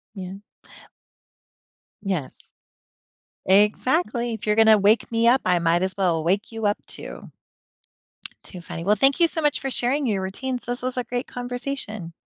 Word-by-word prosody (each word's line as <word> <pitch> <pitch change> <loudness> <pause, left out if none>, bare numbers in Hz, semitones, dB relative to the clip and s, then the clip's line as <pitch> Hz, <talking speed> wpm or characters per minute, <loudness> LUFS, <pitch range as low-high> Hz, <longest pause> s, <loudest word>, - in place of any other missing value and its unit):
Yeah. 185 -1 -6 1.7
Yes. 185 -9 -2 1.2
Exactly, 235 - +2
if 220 - -6
you're 210 0 +2
gonna 220 -1 +7
wake 210 +2 +3
me 230 0 +2
up, 255 +3 +5
I 180 -1 +3
might 170 +1 +2
as 190 -1 -2
well 175 -5 +1
wake 195 +7 0
you 225 -1 -4
up 205 0 +2
too. - - -9 1.1
Too 180 - -9
funny. 165 0 -7
Well, 205 +3 +4
thank 270 - +3
you 340 - +7
so 330 - -3
much 295 -2 +1
for 270 - -3
sharing 260 +3 0
your 200 -5 0
routines, 250 +7 -4
this 245 0 -4
was 255 0 -3
a 250 - -1
great 245 +1 -3
conversation. 245 -7 -5
220 Hz, 160 wpm, -23 LUFS, 190-250 Hz, 1.7 s, gonna